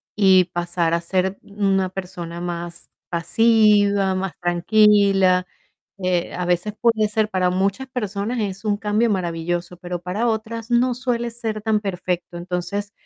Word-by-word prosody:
y 190 -3 +5
pasar 175 -1 -1
a 170 - +2
ser 185 +2 -1
una 195 -2 0
persona 175 -2 -7
más 170 -1 -6 0.2
pasiva, 205 +2 +3
más 190 -1 -3
tranquila. 195 +1 +4 0.5
Eh, 180 -2 -1
a 180 - -2
veces 180 +4 0
puede 225 -3 +3
ser 215 0 0
para 185 -3 +1
muchas 195 +8 -1
personas 215 -1 -3
es 195 0 -4
un 210 -1 +1
cambio 215 +2 +1
maravilloso, 175 -1 -2
pero 175 -1 -5
para 195 +7 -1
otras 225 +1 -3
no 245 +1 +3
suele 240 -1 -2
ser 225 -2 -4
tan 220 -1 +1
perfecto. 180 -3 -3
Entonces, 180 +4 -4
195 Hz, 140 wpm, -22 LUFS, 180-215 Hz, 0.5 s, y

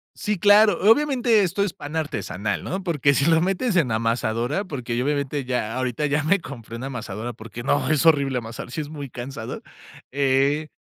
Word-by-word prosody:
Sí, 210 -1 -2
claro. 205 0 +6
Obviamente, 250 -5 +3
esto 190 +1 0
es 200 - -2
pan 145 +2 -8
artesanal, 110 - -3
¿no? 190 +2 -4
Porque, 150 -5 +2
si 140 - +2
lo 165 0 +4
metes 195 +5 0
en 155 -9 +2
amasadora, 115 - 0
porque, 130 -10 -5
yo 125 - 0
obviamente, 145 -1 -1
ya 125 -3 -2
ahorita 130 +2 -1
ya 150 +1 0
me 190 +6 +3
compré 120 -8 -9
una 120 +3 -6
amasadora 120 -2 -5
porque 115 +1 -9
no, 135 0 +1
es 155 -1 +2
horrible 140 -5 +4
amasar, 115 0 -6
si 125 - -4
es 145 - -7
muy 145 -3 -7
cansado, 120 -1 -7 0.5
eh, 140 +2 +1
140 Hz, 190 wpm, -23 LUFS, 120-165 Hz, 0.5 s, claro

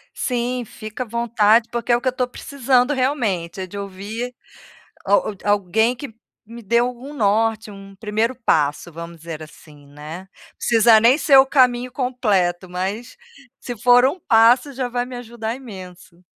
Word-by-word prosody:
Sim, 245 -1 -2
fica 215 +3 -7
à - - -14
vontade 230 -1 +2
porque 235 0 -2
é 240 - +5
o 240 - -8
que 260 - -3
eu - - +5
estou 250 0 -2
precisando 260 +1 0
realmente, 215 - -1
é 185 - -5
de 200 - -9
ouvir 200 +5 -6 0.7
al 200 +1 +1
alguém 205 +4 +1
que 260 -2 -9 0.3
me 235 +2 -11
dê 235 +3 +2
algum 250 +3 -3
norte, 220 -2 +1
um 195 0 -12
primeiro 220 +4 -1
passo, 150 +1 +1
vamos 170 +1 -9
dizer 160 -1 -8
assim, 150 -1 -16
né, 155 +6 -10 0.3
precisa 225 -1 +5
nem 240 +6 +5
ser 280 -4 +5
o 265 - +7
caminho 250 -2 +2
completo, 205 -9 0
mas 195 +7 -4 0.4
se 245 -2 -7
for 245 +2 +5
um 285 +8 0
passo 245 +2 +4
já 255 -1 -3
vai 245 0 -2
me 250 0 -9
ajudar 230 -1 -5
imenso. 185 -7 -12
230 Hz, 165 wpm, -21 LUFS, 195-250 Hz, 0.7 s, o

